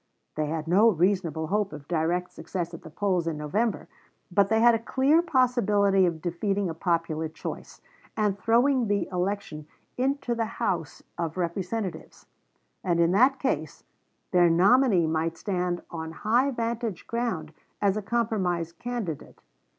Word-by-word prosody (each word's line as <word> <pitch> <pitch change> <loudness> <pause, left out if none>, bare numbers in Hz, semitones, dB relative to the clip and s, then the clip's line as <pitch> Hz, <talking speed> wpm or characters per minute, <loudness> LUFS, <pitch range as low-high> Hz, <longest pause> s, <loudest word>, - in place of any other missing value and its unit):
They 155 0 -2
had 160 +1 -3
no 200 +7 +5
reasonable 175 -4 +1
hope 205 +3 0
of 145 -2 -10
direct 175 +2 0
success 175 +1 -5
at 165 - -8
the 160 - -11
polls 180 0 0
in 160 -2 -2
November; 200 +9 -1 0.4
but 200 +2 +3
they 220 0 +3
had 235 +1 +6
a 225 - +1
clear 270 +7 +3
possibility 210 - +3
of 165 -2 -4
defeating 195 +2 -1
a - - -5
popular 165 -2 -1
choice, 160 - -8 0.4
and 210 -2 +1
throwing 240 +4 +2
the 205 0 0
election 180 -4 -3 0.3
into 270 -1 0
the 230 -1 -3
House 180 - -2 0.2
of 165 0 -3
Representatives; 185 +3 -4 0.6
and 175 -2 +1
in 170 0 +4
that 255 +8 +4
case 265 - -2 0.5
their 175 -2 +5
nominee 195 +2 +4
might 160 +1 -1
stand 180 -3 -2
on 160 -1 -5
high 235 +10 +2
vantage 230 -5 -3
ground 225 -10 -3 0.3
as 200 -1 +2
a 215 - -2
compromise 195 -7 -1
candidate. 230 - -5
190 Hz, 150 wpm, -27 LUFS, 165-230 Hz, 0.6 s, had